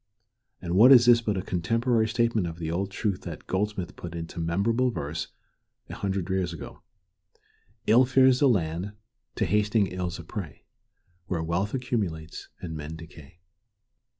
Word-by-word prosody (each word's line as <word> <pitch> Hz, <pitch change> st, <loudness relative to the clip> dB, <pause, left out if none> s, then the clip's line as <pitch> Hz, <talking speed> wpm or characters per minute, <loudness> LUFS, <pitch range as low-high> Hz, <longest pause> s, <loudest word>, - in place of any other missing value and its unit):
And 85 Hz, -1 st, -3 dB
what 115 Hz, +8 st, +7 dB
is 120 Hz, -3 st, +8 dB
this 120 Hz, -1 st, +6 dB
but 105 Hz, -4 st, -1 dB
a 95 Hz, -, -2 dB
contemporary 115 Hz, +6 st, +1 dB
statement 115 Hz, -4 st, +1 dB
of 85 Hz, 0 st, -6 dB
the 80 Hz, -1 st, -4 dB
old 95 Hz, +3 st, -1 dB
truth 100 Hz, -1 st, -3 dB
which -, -, -7 dB
Goldsmith 95 Hz, -2 st, -2 dB
put 85 Hz, -1 st, -8 dB
into 85 Hz, +1 st, -6 dB
memorable 100 Hz, +10 st, +1 dB
verse 75 Hz, -7 st, -4 dB, 0.6 s
a -, -, -5 dB
hundred 95 Hz, -3 st, -2 dB
years 95 Hz, -2 st, -1 dB
ago, 85 Hz, -, -9 dB, 1.0 s
"Ill 125 Hz, +4 st, +6 dB
fares 130 Hz, 0 st, +4 dB
the 140 Hz, -, +5 dB
land, 90 Hz, -1 st, -1 dB, 0.4 s
to -, -, 0 dB
hastening 105 Hz, 0 st, +2 dB
ills 90 Hz, -1 st, -4 dB
a -, -, -9 dB
prey, 95 Hz, -9 st, -7 dB, 0.6 s
Where 85 Hz, -3 st, -2 dB
wealth 90 Hz, +8 st, -1 dB
accumulates 100 Hz, -11 st, -3 dB
and 80 Hz, -3 st, -5 dB
men 75 Hz, +1 st, -6 dB
decay." 80 Hz, 0 st, -13 dB
95 Hz, 155 wpm, -27 LUFS, 85-115 Hz, 1.0 s, is